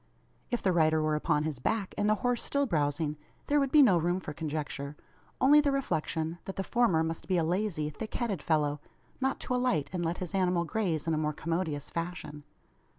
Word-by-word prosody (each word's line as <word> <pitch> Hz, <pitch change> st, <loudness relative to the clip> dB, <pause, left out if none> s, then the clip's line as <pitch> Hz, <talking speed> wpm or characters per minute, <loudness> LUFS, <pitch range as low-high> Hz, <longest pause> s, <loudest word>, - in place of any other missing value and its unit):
If 240 Hz, -, -2 dB
the 190 Hz, -, +3 dB
rider 160 Hz, -2 st, +3 dB
were 155 Hz, 0 st, +1 dB
upon 150 Hz, 0 st, +1 dB
his 155 Hz, -5 st, -3 dB
back, 205 Hz, -, -1 dB
and 205 Hz, -, +1 dB
the 215 Hz, -, +4 dB
horse 245 Hz, -1 st, +1 dB
still 280 Hz, 0 st, +1 dB
browsing, 150 Hz, -, 0 dB, 0.3 s
there 295 Hz, 0 st, +3 dB
would 275 Hz, -2 st, 0 dB
be 300 Hz, -2 st, +8 dB
no 190 Hz, -9 st, +5 dB
room 175 Hz, +3 st, 0 dB
for 155 Hz, -5 st, -6 dB
conjecture 150 Hz, -2 st, -4 dB, 0.4 s
only 295 Hz, +3 st, +7 dB
the 285 Hz, -1 st, +1 dB
reflection, 165 Hz, -, -1 dB
that 195 Hz, -, -5 dB
the 195 Hz, -, -2 dB
former 200 Hz, -8 st, +2 dB
must 165 Hz, 0 st, -4 dB
be 185 Hz, -, +2 dB
a 170 Hz, -, +2 dB
lazy 175 Hz, -2 st, 0 dB
thick 215 Hz, +9 st, -7 dB
headed 210 Hz, -, -1 dB
fellow, 150 Hz, -2 st, +1 dB, 0.4 s
not 265 Hz, +1 st, 0 dB
to -, -, -3 dB
alight 250 Hz, -, +1 dB
and 175 Hz, -2 st, -1 dB
let 165 Hz, +1 st, -1 dB
his 180 Hz, -1 st, -5 dB
animal 180 Hz, -2 st, +2 dB
graze 170 Hz, -5 st, -1 dB
in 165 Hz, -, +1 dB
a 155 Hz, -, +1 dB
more 150 Hz, 0 st, 0 dB
commodious 160 Hz, -2 st, -3 dB
fashion. 170 Hz, -3 st, -5 dB
170 Hz, 210 wpm, -30 LUFS, 155-215 Hz, 0.4 s, be